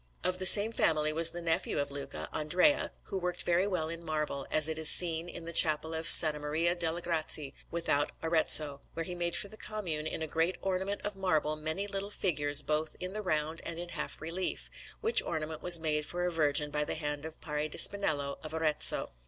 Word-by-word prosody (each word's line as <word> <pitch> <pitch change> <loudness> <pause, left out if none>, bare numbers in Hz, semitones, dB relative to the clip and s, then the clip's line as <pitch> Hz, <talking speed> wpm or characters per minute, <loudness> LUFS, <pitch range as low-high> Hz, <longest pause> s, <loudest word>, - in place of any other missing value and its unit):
Of 185 0 -2
the 185 - +4
same 210 +3 +9
family 155 -7 0
was 165 +1 +5
the 175 +1 -8
nephew 165 -1 -2
of 145 -1 -3
Luca, 140 -1 -7
Andrea, 180 - 0
who 195 - -6
worked 180 0 -4
very 175 +3 0
well 180 -5 -3
in 165 +1 -8
marble, 150 -4 -5
as 155 0 +3
it 160 0 -4
is 160 -1 +7
seen 170 0 +5
in 170 - -10
the 170 - -8
Chapel 160 0 +3
of 160 0 -4
S. - - +10
Maria 150 +3 -2
delle 170 -1 -3
Grazie, 155 -4 -1 0.2
without 155 -4 -2
Arezzo, 155 -3 +4
where 165 - -4
he 180 - -6
made 175 -1 -3
for - - -1
the 215 - -12
Commune, 175 -10 -5
in 160 - -5
a - - -5
great 165 +4 -2
ornament 190 +1 -4
of 205 -1 -5
marble, 155 -5 -2
many 155 +6 -5
little 200 0 -5
figures 145 -8 0
both 155 +1 -2
in 185 +1 -6
the 215 - -5
round 155 -3 -3
and 170 - -8
in 175 0 -8
half - - -4
relief; 170 +4 -6 0.3
which 455 +1 +4
ornament 155 -1 -6
was 175 -1 +7
made 155 -1 -2
for 175 +3 -5
a 180 - -2
Virgin 150 -2 -1
by 150 0 -2
the - - -5
hand 150 -2 -5
of 160 0 -10
Parri 150 0 -5
di - - -8
Spinello 145 -8 +2
of 155 0 -8
Arezzo. 155 -2 +2
160 Hz, 215 wpm, -29 LUFS, 150-180 Hz, 0.3 s, S